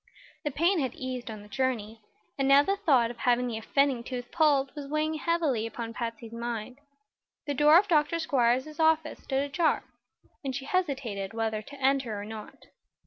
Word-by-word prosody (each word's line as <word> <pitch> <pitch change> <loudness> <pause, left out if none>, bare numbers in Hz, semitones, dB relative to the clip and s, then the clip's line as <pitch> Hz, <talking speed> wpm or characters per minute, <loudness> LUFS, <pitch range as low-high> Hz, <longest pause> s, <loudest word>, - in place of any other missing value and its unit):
The 295 - 0
pain 335 +6 +2
had 260 -4 -2
eased 255 -2 -5
on 215 -2 -7
the - - -14
journey, 225 -2 -2 0.3
and 270 -1 0
now 275 +1 +7
the 395 +6 +1
thought 275 - +3
of 240 - -12
having 245 -1 +2
the 230 -3 -3
offending 270 +1 +1
tooth 245 -1 -6
pulled 290 -4 +3
was 290 -2 -7
weighing 305 +2 0
heavily 310 -8 0
upon 230 0 -6
Patsy's 230 -1 -5
mind. 235 +2 -5 0.7
The 290 - -1
door 295 +3 +6
of 400 +3 +3
Dr. 305 -2 +3
Squiers's 265 -1 +1
office 320 -1 +2
stood 270 0 -1
ajar, 310 +3 +1 0.6
and 265 -2 -3
she 270 0 -5
hesitated 265 - -2
whether 220 -1 -1
to 280 +5 -12
enter 265 -5 +1
or 205 - -6
not. 215 0 -9
265 Hz, 180 wpm, -28 LUFS, 235-300 Hz, 0.7 s, now